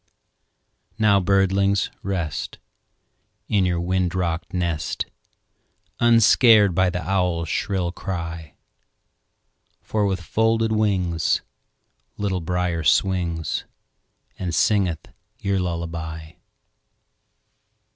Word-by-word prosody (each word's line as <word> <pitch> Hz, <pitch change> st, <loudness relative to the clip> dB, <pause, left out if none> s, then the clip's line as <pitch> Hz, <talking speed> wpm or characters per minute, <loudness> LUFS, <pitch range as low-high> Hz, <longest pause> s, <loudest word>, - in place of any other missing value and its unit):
Now, 105 Hz, -2 st, +4 dB
birdlings, 100 Hz, +1 st, +2 dB
rest, 85 Hz, -9 st, -3 dB, 0.9 s
In 95 Hz, -3 st, +2 dB
your 90 Hz, -1 st, 0 dB
wind 90 Hz, 0 st, 0 dB
rocked 85 Hz, -2 st, -2 dB
nest, 85 Hz, -4 st, -2 dB, 0.9 s
Unscared 115 Hz, -3 st, +6 dB
by 95 Hz, +1 st, +3 dB
the 90 Hz, 0 st, -4 dB
owl's 90 Hz, -4 st, 0 dB
shrill 90 Hz, -1 st, -1 dB
cry; 85 Hz, -4 st, -6 dB, 1.3 s
For 105 Hz, -2 st, 0 dB
with 95 Hz, -2 st, -1 dB
folded 115 Hz, +4 st, +1 dB
wings 95 Hz, -6 st, +1 dB, 0.7 s
Little 95 Hz, -3 st, -1 dB
Brier 90 Hz, -1 st, -1 dB
swings, 85 Hz, -2 st, 0 dB, 0.7 s
And 90 Hz, -3 st, -2 dB
singeth 95 Hz, -7 st, +1 dB, 0.3 s
your 100 Hz, -1 st, -1 dB
lullaby. 80 Hz, -2 st, -4 dB
90 Hz, 85 wpm, -23 LUFS, 85-100 Hz, 1.3 s, Unscared